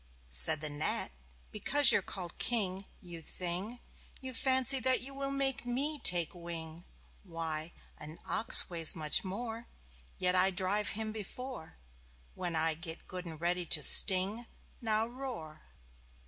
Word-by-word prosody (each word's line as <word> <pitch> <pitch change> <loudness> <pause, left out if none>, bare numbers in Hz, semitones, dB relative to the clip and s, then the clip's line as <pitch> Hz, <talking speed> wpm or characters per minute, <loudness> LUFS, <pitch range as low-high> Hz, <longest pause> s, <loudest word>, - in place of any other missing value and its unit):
Said 65 - +6
the 155 - -4
Gnat: 145 +1 -3 0.4
"Because 275 +6 +3
you're - - 0
called 180 -2 -9
King 195 -5 -3 0.2
you 170 -2 -12
thing! 185 +8 -7 0.4
You 260 -1 -8
fancy 260 +2 +2
that 255 +1 0
you 270 +2 -9
will 275 0 -6
make 275 0 -2
me 275 +5 -4
take 175 - 0
wing. 170 -1 -10 0.4
Why, 165 -3 -7 0.3
an 155 +2 -12
ox 225 - +6
weighs 165 -3 +6
much 155 -2 0
more, 225 +4 -9 0.5
Yet 180 0 -1
I 185 +1 +1
drive 195 +3 -2
him 220 -1 -5
before 220 - -11 0.6
When 175 -2 -7
I 160 0 -1
get 160 +1 -11
good 180 -1 -10
and 160 -2 -11
ready 175 +1 -3
to 150 - +2
sting. 200 +8 +6 0.3
Now, 220 -1 -2
roar!" 235 -12 -11
185 Hz, 145 wpm, -29 LUFS, 165-240 Hz, 0.6 s, Said